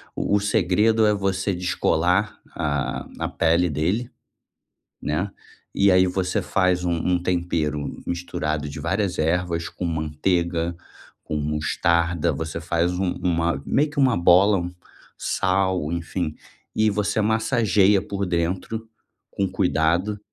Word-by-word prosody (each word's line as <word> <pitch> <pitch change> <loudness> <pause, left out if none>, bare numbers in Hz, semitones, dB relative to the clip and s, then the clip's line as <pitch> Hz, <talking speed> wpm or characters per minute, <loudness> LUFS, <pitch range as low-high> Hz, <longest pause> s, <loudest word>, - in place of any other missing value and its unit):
o - - -4 0.2
o - - +4
segredo 105 +2 +3
é 105 - +4
você 95 -1 -1
descolar 90 +3 +1 0.2
a 75 -4 -2
a - - -2
pele 85 +2 +2
dele, 90 - -1 0.9
né, 90 +7 -1 0.5
e 100 0 +4
aí 95 0 +5
você 90 0 -1
faz 90 -1 +1
um 90 - 0
um 90 +2 0
tempero 85 -5 -2
misturado 85 -4 -2
de 70 - -7
várias 95 +2 -1
ervas 85 +1 0
com 90 - -5
manteiga, 85 +2 -1 0.5
com 75 - -4
mostarda, 85 +3 +1
você 80 +3 -4
faz 85 +1 0
um 95 -1 0
uma 85 -5 0
meio 150 +2 +2
que 145 - -4
uma 130 -6 +4
bola, 95 +4 +5
um 90 0 -3 0.5
sal, 95 -4 0
enfim, 85 -1 -3 0.4
e 110 0 +3
você 105 +1 0
massageia 105 -3 +3
por 100 0 -3
dentro, 90 +6 -2 0.4
com 100 - -1
cuidado. 90 +2 +1
90 Hz, 130 wpm, -23 LUFS, 85-100 Hz, 0.9 s, aí